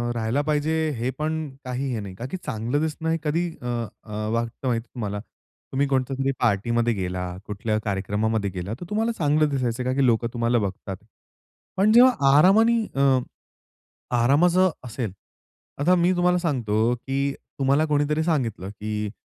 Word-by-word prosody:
राहिलं 115 +5 0
पाहिजे, 150 +1 +1 0.3
हे 120 +3 -1
पण 155 +1 -1 0.3
काही 125 +2 -2
हे 115 - -2
नाही. 100 -2 -7
का 115 - -6
की - - -2
चांगलं 125 -4 -2
दिसणं 160 +1 -2
हे 165 - +2
कधी 165 +3 0
अ, - - -9 0.4
अ, 110 - -13 0.2
वाटतं 115 +3 -2
माहिती 115 -2 0
आहे - - -41
तुम्हाला? 105 -4 -3 0.5
तुम्ही 140 +2 +1
कोणत्यातरी 135 0 0
पार्टीमध्ये 120 +1 +1
गेला, 90 -2 -3 0.2
कुठल्या 105 +1 -2
कार्यक्रमामध्ये 105 +1 -1
गेलात, 95 +3 -5
तर - - -5
तुम्हाला 225 +2 0
चांगलं 150 -1 +2
दिसायचं, 125 -3 -1
का 130 +1 0
की 135 0 +2
लोकं 115 -1 +2
तुम्हाला 120 0 +1
बघतात. 95 -1 -4 0.8
पण 205 +3 +4
जेव्हा 245 +3 +8 0.3
आरामाने 220 +8 +5 0.2
अ, 135 -2 +5 1.0
आरामाचं 170 +9 +4
असेल, 115 -4 -4 0.7
आता 165 +6 +4
मी 175 +1 +3
तुम्हाला 180 0 +3
सांगतो, 120 - +1
की 135 +3 -2 0.3
तुम्हाला 140 +3 +3
कोणीतरी 150 +1 +1
सांगितलं, 115 - -1
की 105 0 -4
130 Hz, 155 wpm, -24 LUFS, 110-155 Hz, 1.0 s, जेव्हा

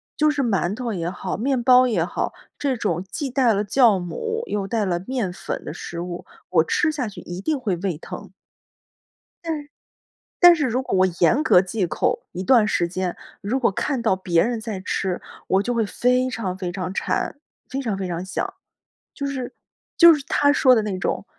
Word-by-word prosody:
就 305 0 +3
是 290 -2 -1
馒 200 -5 0
头 240 -1 -3
也 170 -3 -2
好， 185 0 -4
面 260 +2 0
包 255 +1 +6
也 180 -8 +1
好， - - -3 0.3
这 270 -3 0
种 175 -6 -1
既 285 -4 -3
带 255 -2 +3
了 205 +1 0
酵 230 -2 +4
母 450 - -4
又 200 -2 -2
带 215 -1 0
了 175 -2 0
面 245 -7 -2
粉 - - -5
的 - - -5
食 170 - -7
物， 175 0 -5 0.3
我 - - +4
吃 335 - +1
下 285 -6 -3
去 205 - -10
一 175 +1 -7
定 300 +6 -1
会 210 -7 -1
胃 175 -3 -2
疼。 - - -9 1.1
但 320 -3 -2 0.8
但 350 -1 +9
是 305 -3 0
如 250 +1 0
果 260 - -2
我 185 0 +5
严 230 - +4
格 180 - +6
忌 190 0 -2
口， 155 - -1
一 180 - -5
段 220 +3 +5
时 175 -5 +1
间， 185 0 -3 0.2
如 225 +7 -1
果 255 - +3
看 255 +6 -2
到 220 -5 +2
别 175 -3 +1
人 235 -1 0
在 215 -4 -4
吃， 185 -1 -2 0.3
我 190 +1 +3
就 245 +4 -2
会 225 -2 +1
非 250 +4 +1
常 195 -7 -4
非 180 -2 -4
常 185 0 -4
馋， - - -1 0.3
非 270 +1 -3
常 220 -7 -2
非 190 - -3
常 175 0 -3
想， 190 - -3 0.6
就 280 - -4
是 265 -3 -4 0.4
就 340 -1 +9
是 285 - -6
他 285 0 +4
说 260 -3 +5
的 225 - +3
那 200 -3 -3
种 195 - -2
220 Hz, 220 characters per minute, -23 LUFS, 185-260 Hz, 1.1 s, 但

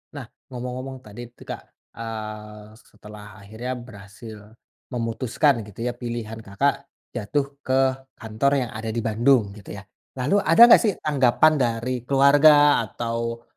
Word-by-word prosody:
Nah - - -7 0.3
ngomong-ngomong 125 +1 -6
tadi 105 +3 -11
itu 120 - -18
Kak, - - -7 0.4
eee, 105 -1 -8
setelah 105 -1 -14 0.2
akhirnya 110 +5 -7
berhasil 110 -2 -12 0.5
memutuskan 120 +3 0
gitu 105 +2 -8
ya 125 - -1
pilihan 120 -2 -6
Kakak 140 +7 -2 0.3
jatuh 125 +5 -1 0.2
ke 130 - -1 0.5
kantor 110 +5 -1 0.2
yang - - -12
ada 110 +1 -6
di 115 - -2
Bandung 115 -1 +2
gitu 100 0 -11
ya. 100 - -10 0.3
Lalu 140 +11 +1
ada 165 +6 +3
nggak - - +7
sih 210 -3 +1
tanggapan 145 +1 +3
dari 120 0 -1 0.2
keluarga 145 +2 +5
atau, 115 +1 -4
120 Hz, 135 wpm, -23 LUFS, 110-135 Hz, 0.5 s, nggak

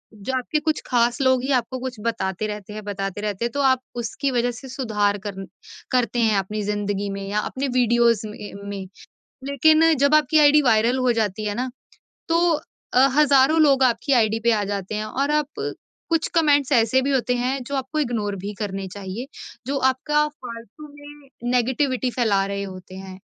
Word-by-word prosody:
जो 210 +6 -5
आपके 300 +4 -1
कुछ 310 0 -1
खास 240 -1 +2
लोग 260 -1 +3
ही 275 - -1
आपको 255 +1 0
कुछ 255 -1 -5
बताते 215 -3 -2
रहते 210 -1 -7
हैं, 215 - -7
बताते 195 0 -4
रहते 210 +2 -2
हैं 240 - -2
तो 285 - -2
आप 260 -2 +3
उसकी 250 +4 -2
वजह 245 0 +1
से 260 +3 -10
सुधार 210 -5 0
करन 195 -2 -6 0.4
करते 245 -2 +1
हैं 220 -3 +3
अपनी 210 +3 -4
ज़िंदगी 205 -1 -2
में 195 0 -5
या 205 +1 -1
अपने 265 +5 -3
वीडियोज़ 235 -3 +3
में 210 -1 -9 0.2
में। 195 -2 -6 0.6
लेकिन 315 +4 +4
जब 280 +2 +4
आपकी 305 +1 +4
आईडी 300 0 +6
वायरल 235 +1 +3
हो 255 -1 +2
जाती 210 0 -2
है 205 - -1
ना, 250 +2 -3 0.6
तो 340 +1 +3 0.4
अ, 265 +2 +6
हज़ारों 295 +1 +5
लोग 275 -3 +4
आपकी 255 +3 +2
आईडी 225 -3 +2
पे 235 - +4
आ 210 -2 +1
जाते 200 +1 -4
हैं 215 - -2
और 275 +7 -1
आप 300 -1 +1 0.6
कुछ 330 -1 +1
कमेंट्स 290 -4 +3
ऐसे 240 +1 +3
भी 275 - -1
होते 250 -2 +1
हैं 255 +2 -1
जो 280 +3 -5
आपको 270 +3 -2
इग्नोर 220 -7 -1
भी 200 +3 -6
करने 195 -2 -4
चाहिए। 200 +6 -7 0.4
जो 280 +1 -1
आपका 300 +3 0
फ़ालतू 245 +1 -11
में 290 -1 -14 0.2
नेगेटिविटी 255 +1 +1
फैला 210 -6 +1
रहे 200 0 -3
होते 185 -1 -9
हैं। 190 0 -9
240 Hz, 190 wpm, -22 LUFS, 210-275 Hz, 0.6 s, आईडी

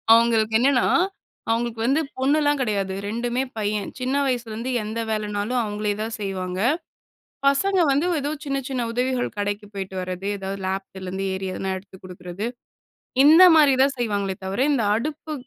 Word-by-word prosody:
அவங்களுக்கு 225 -1 +3
என்னன்னா, 260 0 +3 0.6
அவங்களுக்கு 230 0 -1
வந்து 280 +5 +3 0.2
பொண்ணுலாம் 290 +2 +2
கெடையாது. 200 -5 -1
2மே 240 +4 -1
பையன். 210 -1 -1
சின்ன 255 +2 -1
வயசுலேருந்து 240 -1 -2
எந்த 220 +2 -4
வேலைனாலும் 215 +3 -1
அவங்களே 210 -1 -2
தான் 225 +1 -3
செய்வாங்க. 185 -2 -3 0.9
பசங்க 375 +8 +3
வந்து 285 +5 +2 0.2
எதோ 290 +2 -2
சின்ன, 275 -1 -1
சின்ன 250 -3 -1
உதவிகள் 250 0 -1
கடைக்கு 205 +1 -2
போய்ட்டு 190 -1 -5
வரது, 185 +1 -4
ஏதாவது 195 0 -5
லாஃப்ட்லேருந்து 190 0 -4
ஏறி 190 0 -3
எதனா 190 0 -2
எடுத்து 190 0 -16
குடுக்குறது. 180 +3 -6 0.8
இந்த 320 +5 +9
மாரி 290 -4 +6
தான் 275 0 +1
செய்வாங்களே 205 -5 -1
தவிர, 190 +4 -3
இந்த 250 -5 +1
அடுப்பு 305 +6 -4
220 Hz, 145 wpm, -23 LUFS, 195-260 Hz, 0.9 s, இந்த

